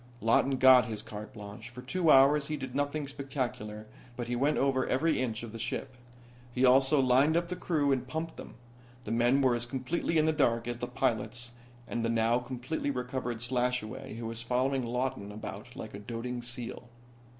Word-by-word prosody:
Lawton 120 +4 +3
got 130 -1 +7
his 110 -2 -5
carte 105 +2 -8
blanche. 110 0 -9
For 125 +1 -10
two 165 +5 0
hours 140 +1 +6
he 155 - -2
did 130 -3 -6
nothing 145 +1 -1
spectacular, 130 -6 -4 0.3
but 120 -1 -4
he 120 - -1
went 145 +5 +2
over 135 -1 +1
every 155 +3 +1
inch 115 -3 -2
of 115 - -7
the 115 - -8
ship. 125 +3 -4 0.6
He 125 +2 +2
also 135 +3 +5
lined 135 +5 +4
up 170 0 -1
the 180 - -2
crew 150 -6 +1
and 130 -2 0
pumped 160 +4 -4
them. - - -10 0.5
The 105 - -4
men 120 +4 +3
were 130 -2 +4
as 120 0 -1
completely 135 +6 -1
in 155 - +4
the 160 - +3
dark 115 -6 +1
as 120 0 -3
the 120 - -3
pilots 120 -2 -1 0.4
and 120 - -2
the 115 - +1
now 115 +1 +2
completely 130 +4 -4
recovered 125 -3 -3
Slashaway, 125 0 -2
who 115 0 -6
was 115 0 -4
following 130 +3 0
Lawton 120 -4 -2
about 105 +1 -8
like - - -7
a 100 - -7
doting 120 +3 -5
seal. 120 0 -4
125 Hz, 195 wpm, -30 LUFS, 115-135 Hz, 0.6 s, got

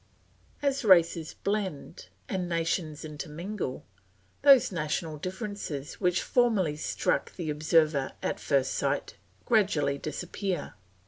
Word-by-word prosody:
As 275 -1 +1
races 170 -5 +4
blend 195 - -3 0.2
and 180 -2 -2
nations 165 -2 -1
intermingle, 155 - -5 0.6
those 275 -6 +7
national 155 -1 -2
differences 185 - -5
which 180 -1 +2
formerly 215 -11 +2
struck 150 - -1
the 165 -4 -3
observer 155 -2 +2
at - - -1
first 135 -2 +1
sight - - -1 0.3
gradually 190 - +2
disappear. 175 +4 -4
170 Hz, 105 wpm, -29 LUFS, 150-200 Hz, 0.6 s, those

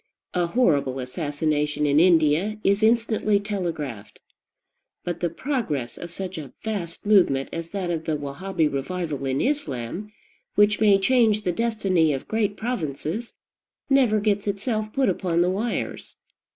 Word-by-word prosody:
A 175 -1 +1
horrible 150 - +2
assassination 150 +2 -1
in 145 +1 +4
India 170 +4 +3
is 200 +2 +2
instantly 220 -2 +3
telegraphed; 165 - -4 0.8
but 175 -1 -3
the 175 - 0
progress 165 - -2
of 175 - -7
such 185 0 -5
a 140 -4 -9
vast 195 -7 -4
movement 175 -10 +4
as 165 0 -5
that 185 -3 -3
of 160 -1 -3
the 155 - 0
Wahabee 155 +4 -1
revival 150 0 -3
in 135 +1 0
Islam, 200 - -2 0.4
which 205 0 +4
may 205 -2 +6
change 215 0 +3
the 180 - +1
destiny 195 -7 +1
of 135 - -5
great 215 -2 0
provinces, 215 - -3 0.6
never 250 -6 +4
gets 205 -1 0
itself 215 +2 -2
put 270 +1 +1
upon 175 -2 +1
the 180 - +1
wires. 220 +5 -3
180 Hz, 140 wpm, -24 LUFS, 150-215 Hz, 0.8 s, may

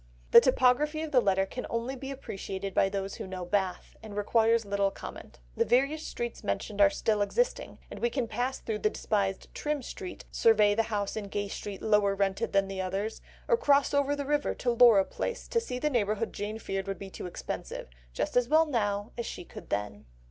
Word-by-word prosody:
The - - +10
topography 270 +4 +3
of 315 - -5
the 255 -4 +5
letter 195 -2 +2
can 250 +6 -6
only 235 +3 -2
be 270 +1 -7
appreciated 195 -7 -5
by 195 - +3
those 195 0 -3
who - - -6
know 185 -1 -5
Bath, 190 -1 -2
and 215 -2 -9
requires 225 +2 +3
little 200 0 +1
comment. - - -10 0.2
The - - +3
various 275 +5 +2
streets 240 -1 -5
mentioned 200 - -2
are 200 - +8
still 210 +1 0
existing, 485 - 0
and - - -7
we 235 - +1
can 240 -1 -2
pass 245 +4 -2
through 215 -2 -4
the 215 - +2
despised 200 -3 -2
Trim 295 -2 -2
Street, 365 +7 -8
survey 210 -2 +4
the 225 - +2
house 205 -2 -2
in 215 -2 -3
Gay 205 0 -3
Street 200 -1 -6
lower 210 -2 +3
rented 195 -1 0
than 195 0 +2
the 195 -1 -4
others, 195 +4 -3 0.3
or 475 - +4
cross 285 -9 +3
over 285 0 +2
the 285 -1 -4
river 290 0 0
to 245 - 0
Laura 235 -5 +6
Place 485 - -4
to 465 - +2
see 455 - -5
the 300 +4 0
neighbourhood 215 -2 0
Jane 210 +2 -4
feared 195 -3 -4
would 195 -1 -3
be 195 -1 -9
too - - -6
expensive, 175 - -6 0.2
just - - -3
as 245 -1 +3
well 315 +1 +5
now, 205 -6 -1
as 235 - -2
she 180 - -6
could - - -11
then. 105 -2 -3
215 Hz, 210 wpm, -29 LUFS, 195-255 Hz, 0.3 s, The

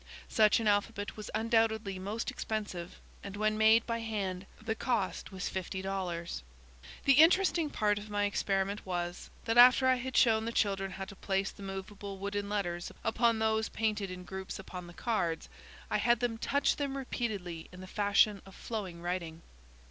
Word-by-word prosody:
Such 215 0 +5
an 225 - -1
alphabet 205 0 0
was 215 - -7
undoubtedly 220 -3 +1
most 205 +5 -3
expensive 205 -6 -4 0.2
and 200 -1 -6
when 215 0 +1
made 220 +1 +5
by 230 -1 -2
hand 195 -4 -3
the 220 0 -2
cost 225 -4 -1
was 190 -1 -4
fifty 190 0 -4
dollars. 175 - -3 0.6
The 275 - +7
interesting 340 -1 +4
part 210 -5 +1
of 210 +1 -10
my 205 0 0
experiment 200 0 0
was, 175 -1 -4 0.2
that 230 +1 +3
after 255 +2 +8
I 255 0 +4
had 260 +1 -3
shown 220 -2 +4
the 230 - -2
children 195 -4 +1
how 190 +1 -5
to 200 - -11
place 195 0 -1
the - - -15
movable 195 +1 -6
wooden 200 +1 -3
letters 175 -4 -2
upon 230 0 +2
those 220 0 +1
painted 215 -3 -1
in 180 0 -7
groups 190 +1 -6
upon 180 -2 -8
the 175 - -12
cards, 175 -9 -1 0.4
I - - +3
had 240 -1 +3
them 235 -2 -1
touch 285 +4 +1
them 280 -1 -2
repeatedly 200 -10 -4
in 180 - -11
the - - -7
fashion 205 +1 +3
of 195 - -14
flowing 190 -7 -5
writing. 170 -2 -3
205 Hz, 175 wpm, -32 LUFS, 190-225 Hz, 0.6 s, after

